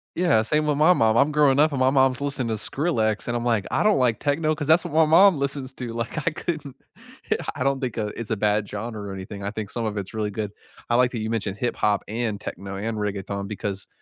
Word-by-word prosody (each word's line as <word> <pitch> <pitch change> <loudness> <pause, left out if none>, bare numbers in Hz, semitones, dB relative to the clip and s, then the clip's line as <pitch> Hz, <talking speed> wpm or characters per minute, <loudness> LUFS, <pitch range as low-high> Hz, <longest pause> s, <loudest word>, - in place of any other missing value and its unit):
i - - -5
yeah, 115 -12 +4
same 150 +6 +1
with 145 -1 +1
my 160 +4 +6
mom, 115 -7 +3
I'm 145 +4 +4
growing 145 -2 +4
up 155 +1 +5
and 140 - -2
my 130 0 +4
mom's 135 0 +3
listening 140 -4 -2
to - - 0
Skrillex, 110 -3 -1
and 120 - -1
I'm 120 - -2
like, 115 -4 +1
"I - - +1
don't 210 -1 +4
like 125 -3 +2
techno 155 +2 +1
'cause 150 -1 -4
that's 160 +2 +4
what - - -6
my 160 0 +5
mom 175 +3 +6
listens 140 -1 -3
to," 120 -2 -5
like, 115 +6 -3
I - - +7
couldn't 155 -4 -5 0.6
Yeah, - - +3 0.2
I 130 - -2
don't 140 0 0
think, 125 -4 -3
uh, 105 -2 -2
it's 115 -2 -6
a 110 - 0
bad 105 0 +1
genre 110 +1 -5
or 95 - -5
anything, 95 +1 -7
I 100 - -2
think 105 -1 -6
some 115 -2 -3
of 105 -1 -3
it's 100 +2 -5
really 110 -1 -1
good. 105 0 -4 0.4
I 120 - +2
like 125 0 +4
that 115 - -4
you 110 +1 -3
mentioned 105 -3 -2
hip-hop 105 -4 0
and 110 -1 -2
techno 100 -1 -7
and 110 +3 -3
reggaeton 100 -1 -3
because, 100 -2 -5
120 Hz, 260 wpm, -24 LUFS, 105-140 Hz, 0.6 s, I